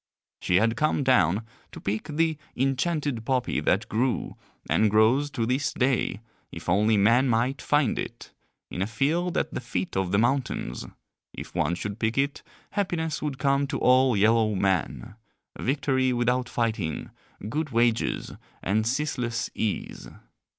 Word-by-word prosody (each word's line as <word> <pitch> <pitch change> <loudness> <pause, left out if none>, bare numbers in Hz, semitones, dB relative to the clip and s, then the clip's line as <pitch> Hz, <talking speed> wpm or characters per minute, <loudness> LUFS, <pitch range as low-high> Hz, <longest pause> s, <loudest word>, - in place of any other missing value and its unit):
She 90 - 0
had 115 +4 +3
come 155 -1 +1
down 110 -6 +3 0.3
to - - -9
pick 105 +2 -3
the 160 +1 0 0.2
enchanted 135 -1 0
poppy 130 +1 0
that - - +1
grew, 120 +3 -1 0.3
and 110 - +3
grows 110 +8 +3
to 115 -5 -2
this 130 +4 0
day 125 -6 0 0.3
if 80 - -9
only 105 +4 +3
men 115 +6 +4
might 120 +4 +1
find 145 -5 +1
it - - -7 0.4
in 90 - -4
a 95 - 0
field 155 +10 0
at - - -1
the - - -3
feet 95 -7 -4
of 95 -2 0
the 100 - +3
mountains; 120 - -1 0.5
if - - -8
one 85 +4 0
should 100 +4 -5
pick 110 +2 -1
it 140 +1 0 0.3
happiness 170 -6 -1
would 145 -3 -3
come 140 0 +1
to - - -2
all 130 -2 +4
yellow 110 +1 +3
men, 95 -2 -1 0.5
victory 130 -1 +1
without 125 0 0
fighting, 110 -9 -2 0.4
good 150 +7 -2
wages, 115 -2 +1 0.3
and 110 +3 +1
ceaseless 120 -4 -1
ease. 110 -2 -3
120 Hz, 150 wpm, -26 LUFS, 110-135 Hz, 0.5 s, men